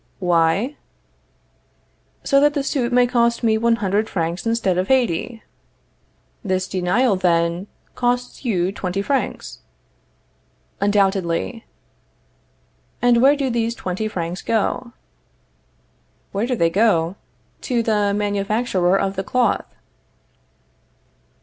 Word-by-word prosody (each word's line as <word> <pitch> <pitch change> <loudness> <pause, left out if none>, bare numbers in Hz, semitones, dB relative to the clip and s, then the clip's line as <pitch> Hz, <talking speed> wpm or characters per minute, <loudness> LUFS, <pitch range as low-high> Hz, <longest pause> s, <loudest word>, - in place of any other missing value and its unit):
Why? 180 - +1 1.5
So 275 - +3
that 295 +1 +3
the 285 - 0
suit 260 -3 -1
may 245 0 +4
cost 235 -1 +1
me 220 -1 +3
one 235 0 +3
hundred 210 0 -1
francs 170 +3 -2
instead 220 -6 +1
of 185 - -2
eighty. 240 -3 0 1.0
This 185 -2 -1
denial, 190 +6 +1
then, 170 0 0 0.3
costs 245 +1 -2
you 190 -7 0
twenty 195 0 -3
francs? 265 - -2 1.2
Undoubtedly. 195 - 0 1.3
And 240 0 +3
where 275 +3 +6
do 275 -3 -1
these 230 0 -1
twenty 190 +2 -3
francs 175 -3 -4
go? 230 +2 -1 1.4
Where 205 +4 -1
do 250 - 0
they 165 -6 +1
go? 185 -4 +2 0.5
To 240 -2 +1
the 210 -2 +1
manufacturer 200 -2 0
of 195 0 -1
the 190 - -2
cloth. 245 +1 +1
205 Hz, 110 wpm, -21 LUFS, 185-240 Hz, 1.5 s, where